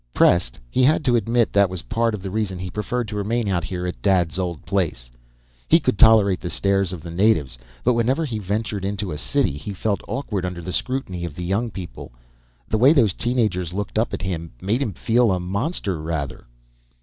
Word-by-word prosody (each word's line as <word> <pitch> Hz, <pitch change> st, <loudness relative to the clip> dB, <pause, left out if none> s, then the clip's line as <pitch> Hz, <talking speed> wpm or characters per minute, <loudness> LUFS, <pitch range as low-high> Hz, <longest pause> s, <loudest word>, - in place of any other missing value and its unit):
Pressed, 85 Hz, -9 st, +3 dB
he 95 Hz, -, 0 dB
had 150 Hz, +4 st, +3 dB
to 125 Hz, -2 st, +4 dB
admit 115 Hz, 0 st, +1 dB
that 100 Hz, -2 st, +4 dB
was 90 Hz, -4 st, -5 dB
part 115 Hz, +1 st, 0 dB
of 95 Hz, -, -9 dB
the 95 Hz, -, -4 dB
reason 105 Hz, -3 st, -1 dB
he 90 Hz, 0 st, -5 dB
preferred 115 Hz, +3 st, -2 dB
to 105 Hz, -, -5 dB
remain 110 Hz, +2 st, -1 dB
out 90 Hz, -4 st, 0 dB
here 90 Hz, +3 st, -4 dB
at 90 Hz, -, -5 dB
Dad's 95 Hz, -3 st, +2 dB
old 85 Hz, -5 st, -3 dB
place 80 Hz, -11 st, -1 dB
now. -, -, -29 dB, 0.5 s
He -, -, +6 dB
could 100 Hz, -, -1 dB
tolerate 105 Hz, -4 st, +6 dB
the 85 Hz, -, -4 dB
stares 100 Hz, 0 st, +1 dB
of 90 Hz, -4 st, -5 dB
the 85 Hz, -, -8 dB
natives, 85 Hz, -, +2 dB, 0.3 s
but 125 Hz, -, +4 dB
whenever 130 Hz, +7 st, +1 dB
he 115 Hz, -7 st, -3 dB
ventured 105 Hz, 0 st, -2 dB
into 100 Hz, -1 st, -3 dB
a 75 Hz, -, -4 dB
city 140 Hz, -, +1 dB
he 75 Hz, +8 st, -6 dB
felt 100 Hz, +1 st, -1 dB
awkward 115 Hz, -8 st, -3 dB
under 90 Hz, -1 st, -4 dB
the 90 Hz, +1 st, -5 dB
scrutiny 125 Hz, -10 st, -2 dB
of 85 Hz, -4 st, -5 dB
the 90 Hz, -, -5 dB
young 105 Hz, +6 st, 0 dB
people. 95 Hz, -, -8 dB, 0.6 s
The 110 Hz, -, 0 dB
way 135 Hz, +6 st, +7 dB
those 115 Hz, -, +3 dB
teen 125 Hz, +5 st, -2 dB
agers 90 Hz, -7 st, 0 dB
looked 105 Hz, +2 st, -2 dB
up 115 Hz, -, 0 dB
at -, -, -4 dB
him 85 Hz, -3 st, -4 dB
made 110 Hz, -, 0 dB
him 110 Hz, -8 st, -1 dB
feel 115 Hz, -1 st, +2 dB
a 90 Hz, -, +1 dB
monster, 100 Hz, -, -2 dB
rather. 80 Hz, -3 st, -4 dB
100 Hz, 220 wpm, -22 LUFS, 90-115 Hz, 0.6 s, way